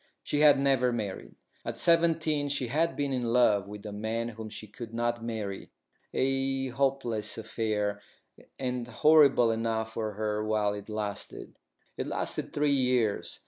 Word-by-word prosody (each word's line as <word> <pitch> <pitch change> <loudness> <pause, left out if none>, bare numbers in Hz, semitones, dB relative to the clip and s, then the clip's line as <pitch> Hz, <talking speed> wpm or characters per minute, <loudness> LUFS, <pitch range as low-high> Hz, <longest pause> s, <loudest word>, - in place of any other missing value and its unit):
She 145 - -1
had 150 -1 +7
never 135 -3 +3
married. 105 -5 -5 0.3
At - - -4
seventeen 165 -3 +2
she 135 -4 -1
had 165 +6 +1
been 140 -1 -1
in 125 - 0
love 105 -5 +3
with 105 +1 -9
a 105 - -5
man 110 +3 -2
whom 110 -1 -8
she 110 0 -7
could 115 +2 -9
not 120 0 -1
marry, 110 -4 -4 0.4
a 135 0 0
hopeless 125 -5 0
affair, 105 -2 -2 0.6
and 125 -2 -2
horrible 135 -1 +5
enough 110 0 -2
for 110 -2 -3
her 105 0 -2
while 105 -1 +1
it 105 +1 -8
lasted. 105 -1 -5 0.4
It - - -3
lasted - - -3
three 145 0 +1
years. 125 -6 +1
115 Hz, 150 wpm, -29 LUFS, 110-135 Hz, 0.6 s, had